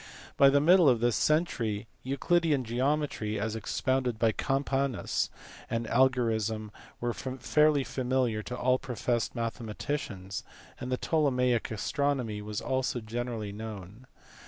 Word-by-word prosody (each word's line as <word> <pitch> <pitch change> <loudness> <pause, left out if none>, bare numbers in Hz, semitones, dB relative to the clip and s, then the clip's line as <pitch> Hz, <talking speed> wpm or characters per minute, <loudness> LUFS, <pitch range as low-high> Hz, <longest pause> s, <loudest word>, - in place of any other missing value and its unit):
By 140 - +7
the 140 +1 +4
middle 170 +1 +6
of 120 -3 +3
this 120 -1 +2
century 115 -9 +1 0.2
Euclidean 150 +1 +1
geometry 125 -3 -1
(as 110 +1 -2
ex 110 - -3
pounded 130 -3 +1
by 115 0 +3
Campanus) 135 -1 0 0.4
and 115 0 -1
algorism 115 -4 +1 0.3
were 120 0 -1
fairly 140 +3 +2
familiar 125 -4 0
to 125 +3 -6
all 130 +1 +2
professed 120 -2 -2
mathematicians, 115 -4 -4 0.4
and 125 - -5
the 125 - +1
Ptolemaic 125 -7 +1
astronomy 120 -1 -1
was 105 0 -4
also 130 -1 -1
generally 115 -1 -4
known. 105 +2 -8
125 Hz, 125 wpm, -29 LUFS, 110-135 Hz, 0.4 s, By